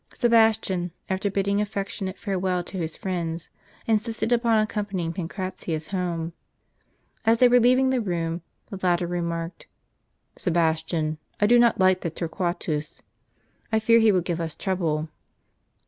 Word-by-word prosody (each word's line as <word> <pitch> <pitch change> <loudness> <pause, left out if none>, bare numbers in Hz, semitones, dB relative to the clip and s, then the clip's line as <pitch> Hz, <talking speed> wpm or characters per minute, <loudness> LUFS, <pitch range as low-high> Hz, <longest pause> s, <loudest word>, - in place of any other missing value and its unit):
Sebastian, 220 -7 +3 0.2
after 190 +2 0
bidding 200 +1 +1
affectionate 200 -2 -4
farewell 185 -3 -1
to 190 - -7
his 160 -2 -3
friends, 170 -3 -3 0.3
insisted 225 +1 0
upon 235 -2 +3
accompanying 205 -5 -1
Pancratius 170 -3 -4
home. 175 -3 -2 0.9
As 225 0 +4
they 250 - +6
were 245 0 +6
leaving 255 +2 +4
the 255 -2 +1
room, 170 -4 -2 0.3
the 195 - -5
latter 175 -1 +2
remarked, 170 -1 -4 0.4
" - - -37
Sebastian, 160 -2 0 0.2
I 205 - +4
do 240 +3 +6
not 235 -3 +4
like 185 0 +4
that 170 -2 -4
Torquatus. 170 -3 -3 0.7
I 220 - +3
fear 230 +1 +5
he 220 -1 +5
will 185 -2 +2
give 170 -1 -2
us 160 -2 -4
trouble." 165 -5 -1
185 Hz, 140 wpm, -25 LUFS, 170-215 Hz, 0.9 s, they